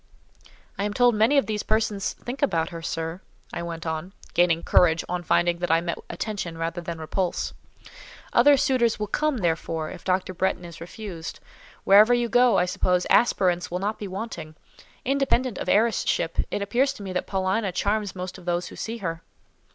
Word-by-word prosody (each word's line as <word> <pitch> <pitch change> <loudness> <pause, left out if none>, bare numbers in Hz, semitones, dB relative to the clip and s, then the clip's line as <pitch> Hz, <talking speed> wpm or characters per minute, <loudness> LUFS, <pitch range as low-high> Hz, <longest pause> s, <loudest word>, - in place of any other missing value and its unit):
"I - - 0
am 205 0 -2
told 245 -1 +5
many 220 +7 +3
of 275 - +4
these 210 0 -2
persons 215 -2 0
think 250 +3 -7
about 165 - +1
her, 165 -1 -7
sir," 165 +2 -4 0.3
I - - -3
went 170 -1 -6
on, 160 +3 -4 0.2
gaining 170 -1 +3
courage 165 -2 +4
on 180 0 -2
finding 175 0 +2
that 175 - -2
I 165 +1 +4
met 170 0 -3
attention 175 -2 -4
rather 165 +1 -3
than 170 -1 -5
repulse. 170 +3 -2 0.8
"Other 280 +4 +6
suitors 255 -4 +2
will 210 - -2
come, 300 +6 0
therefore, 165 -4 -1
if - - -10
Dr. 185 0 0
Bretton 185 0 -1
is 170 -1 -11
refused. 175 -2 -7 0.4
Wherever 210 +5 +7
you 240 -1 0
go, 245 +2 +5
I 180 - +3
suppose, 180 0 +1
aspirants 180 -7 +3
will 180 - -2
not 205 +3 -2
be 205 - -5
wanting. 185 -6 -6 0.5
Independent 260 -3 +1
of - - -3
heiress 220 0 +3
ship, 165 -1 -1
it 200 - -2
appears 265 +6 +1
to 205 - -10
me 190 -1 -5
that 180 - -2
Paulina 190 +1 0
charms 205 +2 -1
most 180 0 -6
of 180 - -15
those 175 0 -1
who - - -11
see 230 +1 -4
her." 165 0 -3
185 Hz, 190 wpm, -25 LUFS, 170-220 Hz, 0.8 s, Wherever